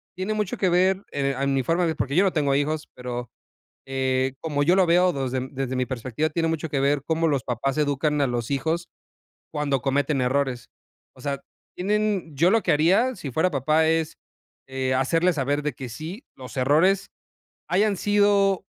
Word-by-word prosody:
tiene 190 +4 -2
mucho 210 -3 -2
que 190 - +1
ver, 185 +2 +2
eh, 140 -1 0
a 140 - 0
mi 135 -1 +1
forma 165 +7 +1
de - - +2
ver, 160 - -1
porque 140 +2 -2
yo 190 - +6
no 190 - +1
tengo 145 -3 +1
hijos, 150 +2 -1
pero, 125 -1 -6 0.5
eh, 130 0 0
como 145 -3 -1
yo 175 +5 +4
lo 190 - +5
veo 180 +2 +4
des 135 -3 -3 0.2
desde 135 -1 -3
mi 130 0 0
perspectiva, 130 +4 -2
tiene 165 +1 0
mucho 160 -1 -2
que 145 - -1
ver 140 0 +1
cómo 165 0 +1
los 140 -5 0
papás 130 +3 -2
educan 150 0 +1
a 140 - +2
los 120 0 -3
hijos 160 +5 -1 0.6
cuando 140 -3 -1
cometen 140 0 0
errores. 125 -1 -1 0.5
O - - -15
sea, 140 -2 -3 0.3
tienen, 200 -4 -1
yo 170 +6 +4
lo 225 +1 +3
que - - +1
haría 195 +12 +3
si 145 -7 -6
fuera 160 +8 +2
papá 155 +3 +2
es, 160 0 0 0.5
eh, 130 -1 -1
hacerles 165 +7 +2
saber 145 +1 -1
de 150 -1 -2
que 125 0 -8
sí, 160 - -7
los 130 +1 -10
errores 160 +9 +3 0.6
hayan 200 +1 +2
sido 200 -2 +2
150 Hz, 190 wpm, -24 LUFS, 135-175 Hz, 0.6 s, yo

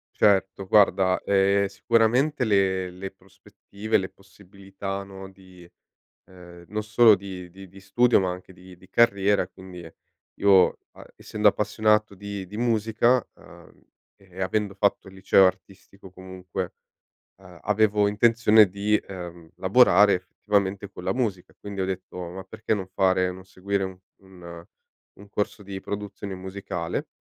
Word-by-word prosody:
Certo, 95 -1 +2
guarda, 95 -2 +3
ehm, 100 0 +2
sicuramente 115 +8 +1
le 95 -4 +1
le 95 +2 -8
prospettive, 100 +3 -5
le 95 -1 -4
possibilità, 95 0 -9
no, 95 -1 -11
di 95 -2 -17 0.6
ehm, 90 -1 -15
non 110 0 -3
solo 110 +1 +5
di 95 -2 -9
di 95 +2 -13
di 95 +2 -15
studio, 120 +5 +3
ma 95 -1 -1
anche 90 +1 -10
di 90 0 -15
di 95 +1 -20
carriera, 100 -5 +2
quindi 90 -2 -12 0.5
io, 95 -2 +4
a - - -15
essendo 105 0 -1
appassionato 105 0 +1
di 100 0 -7
di 105 +3 -9
musica, 115 +1 +1
ehm, - - -18 0.4
e 95 -1 -12
avendo 100 +1 -1
fatto 100 0 0
il 95 - -13
liceo 95 0 +4
artistico 95 0 -9
comunque, 95 0 -7 0.7
ehm, 90 -2 -16
avevo 105 0 +2
intenzione 110 0 +4
di, 100 +2 +1
ehm, 85 -4 -9
lavorare, 105 0 +5
effettivamente, 100 +1 -2
con - - -11
la - - 0
musica. 105 -8 -3
Quindi 100 -1 -7
ho - - 0
detto: 95 -1 -6
"Ma 95 +2 -8
perché 105 +3 -5
non 95 -3 -5
fare 95 -1 +1
non 95 0 -12
seguire 95 +1 -3
u 95 -1 -8 0.2
un 85 -3 -12 0.5
un 100 +1 -14
corso 105 0 -3
di 95 0 -6
produzione 100 0 -6
musicale?" 95 -2 -5
95 Hz, 145 wpm, -25 LUFS, 95-105 Hz, 0.7 s, solo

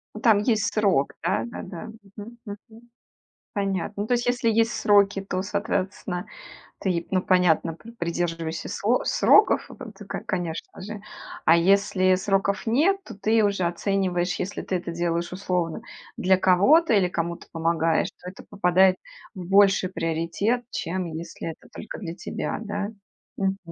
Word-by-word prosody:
Ну, - - -6
там 220 -4 +5
есть 220 0 +1
срок, 195 -10 +2
да-да-да. 165 - -3 0.3
Мгм. 230 +3 -9
Мгм. 215 +2 -11 0.7
Понятно. 195 -1 -1
Ну, - - -3
то 245 - +2
есть, 240 +1 0
если 245 -1 +1
есть 225 +1 +2
сроки, 200 -1 +3
то, 185 -1 -3
соответственно, 195 -2 -3 0.5
ты, 175 -3 -1
ну, 185 -1 +2
понятно, 180 -3 +2
при 230 +7 -13
придерживаешься 170 -5 -3
со 235 +5 0
сроков, - - +4 0.3
ты, - - -11
ко - - -4
конечно 175 -3 -4
же. 210 +2 -7 0.5
А 165 - +7
если 185 +1 +3
сроков 195 +2 0
нет, 315 - +3
то - - -9
ты 220 +3 +2
уже 200 -2 +1
оцениваешь: 180 0 0
если 190 +2 -4
ты 190 - -2
это 175 -1 -3
делаешь 170 0 -2
условно 180 -3 -2 0.4
для 190 +1 +4
кого-то 215 - +4
или 195 -4 +4
кому-то 170 -1 -4
помогаешь, 165 0 +1
то 180 - -7
это 185 - -12
попадает 185 -1 +3 0.4
в 185 -4 -7
больший 195 -1 +4
приоритет, 170 +8 -1
чем 185 +1 -3
если 165 +1 -7
это - - -16
только - - -8
для 170 -6 -6
тебя, - - -4
да. 205 -1 -3 0.5
Мгм. 195 0 0
190 Hz, 150 wpm, -25 LUFS, 175-205 Hz, 0.7 s, А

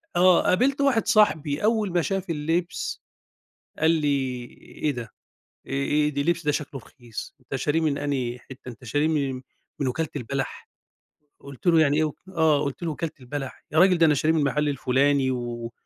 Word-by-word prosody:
آه، 180 0 +6
قابلت 270 +9 +2
واحد 260 -5 +2
صاحبي 155 -8 +3
أول 215 -2 +2
ما 175 0 +2
شاف 195 +1 -2
اللبس، 165 +3 -2 0.8
قال 160 +1 +4
لي 140 -6 0 0.4
إيه 150 - +3
ده، 120 -4 -5 0.6
آآ - - -8
آآ 145 +2 +1
ده 140 -1 -2
اللِبس 170 +2 0
ده 150 - +3
شكله 145 -3 -4
رخيص، 120 -3 -9
أنت - - -6
شارِيه 160 +2 0
من 150 -3 +1
أنهي 130 -4 -2
حِتّه، 125 +1 -11
أنت 120 -1 -12
شارِيه 145 +6 +1
من 140 -5 -1 0.4
من 140 - 0
وكالة 155 +5 -1
البلح، 135 0 -4 0.7
قُلت 140 +4 -12
له 165 -2 +6
يعني 145 -1 +3
إيه 155 - +3
وك 150 - -4
آه، 160 -5 +2
قُلت 140 +5 -5
له 170 - -1
وكالة 160 +1 -4
البلح؟ 135 +1 -6
يا 155 - +1
راجل 180 0 +6
ده 165 - +6
أنا 150 - +4
شاريه 155 +3 +2
من 155 -3 +2
محل 150 +2 +1
الفُلاني، 135 0 +2
و 120 -2 -4
150 Hz, 185 wpm, -25 LUFS, 135-165 Hz, 0.8 s, آه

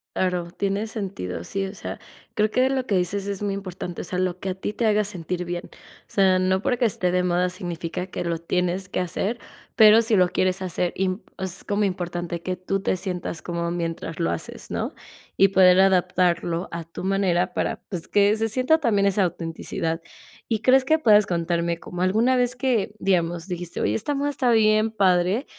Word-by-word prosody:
Claro, 180 -2 -1
tiene 200 +3 -2
sentido. 185 - -5
Sí, 195 0 -2
o 190 - -8
sea, - - -6 0.4
creo 215 0 +1
que 255 +1 +3
lo 260 -1 -1
que 200 - 0
dices 195 +3 -1
es 200 0 -4
muy 200 -1 -1
importante. 185 -3 -6
O - - -6
sea, 180 +1 -3
lo 180 -1 -1
que 190 - -3
a 185 - -2
ti 205 +2 -4
te 230 - -1
haga 210 -1 +3
sentir 180 -2 -4
bien. 175 0 -4
O - - -27 0.4
sea, 190 -2 +3
no 190 +1 +1
porque 245 +1 0
esté 180 -5 +1
de 180 0 +2
moda 180 0 +1
significa 175 0 -5
que 175 - -5
lo 170 -1 -1
tienes 180 +2 -1
que - - -2
hacer, 195 +6 -2 0.4
pero 220 +1 +8
si 220 -3 +2
lo 180 -1 +5
quieres 185 +1 0
hacer 180 -1 -1
imp 185 +1 -1
es 190 0 -3
como 205 0 0
importante 175 -2 -3
que 185 0 -3
tú 195 +1 -2
te 185 - 0
sientas 180 -4 -4
cómodo 170 0 -3
mientras 165 -1 -4
lo 165 - +1
haces, 85 - -6
¿no? - - -3 0.4
Y 195 - +6
poder 185 -1 +6
adaptarlo 180 -2 +2
a 170 0 -4
tu 170 +3 -8
manera 180 -2 +1
para, - - -1
pues, 180 -5 -6
que 205 +1 +4
se 225 0 -1
sienta 260 +8 +2
también 205 -8 +2
esa 200 0 +2
autenticidad. 165 -1 -3 0.5
Y 220 -2 +1
crees 260 +3 +5
que 315 +4 +2
puedas 210 -6 +5
contarme 170 -1 -1
como 180 0 -7
alguna 225 +8 +3
vez 250 0 +1
que 245 -6 0
digamos, 175 -2 0
dijiste: 175 -1 -5
"Oye, - - +1
esta 255 +7 -1
moda 285 +1 0
está 250 -3 +1
bien, 215 0 +4
padre", 190 +4 +2
185 Hz, 200 wpm, -24 LUFS, 175-210 Hz, 0.5 s, pero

